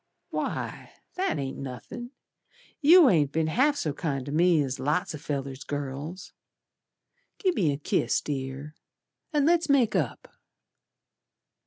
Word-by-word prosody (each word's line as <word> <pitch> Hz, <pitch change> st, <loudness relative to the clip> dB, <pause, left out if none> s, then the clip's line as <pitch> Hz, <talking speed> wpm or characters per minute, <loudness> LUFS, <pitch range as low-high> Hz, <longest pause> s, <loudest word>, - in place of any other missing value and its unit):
"Why, -, -, -4 dB, 0.2 s
that 375 Hz, -, -1 dB
ain't 135 Hz, -2 st, -4 dB
nothin'. 140 Hz, -, -7 dB, 0.7 s
You 325 Hz, +2 st, +8 dB
ain't 150 Hz, -, +3 dB
be'n 160 Hz, +1 st, +1 dB
half 260 Hz, -, +2 dB
so 155 Hz, -, -2 dB
kind 140 Hz, -5 st, -3 dB
to 140 Hz, -, -5 dB
me 170 Hz, +1 st, +4 dB
As 135 Hz, -1 st, -4 dB
lots 160 Hz, +7 st, 0 dB
o' 150 Hz, -, -6 dB
fellers' 140 Hz, -2 st, -4 dB
girls. 145 Hz, +5 st, -5 dB, 1.0 s
Gi' 380 Hz, -3 st, +2 dB
me 180 Hz, -, +1 dB
a 140 Hz, -, -2 dB
kiss, 145 Hz, -, +1 dB
Dear, 135 Hz, +1 st, -5 dB, 0.6 s
And 295 Hz, -3 st, +2 dB
let's 335 Hz, -1 st, +3 dB
make 260 Hz, -6 st, +3 dB
up." -, -, -2 dB
155 Hz, 135 wpm, -27 LUFS, -, 1.0 s, You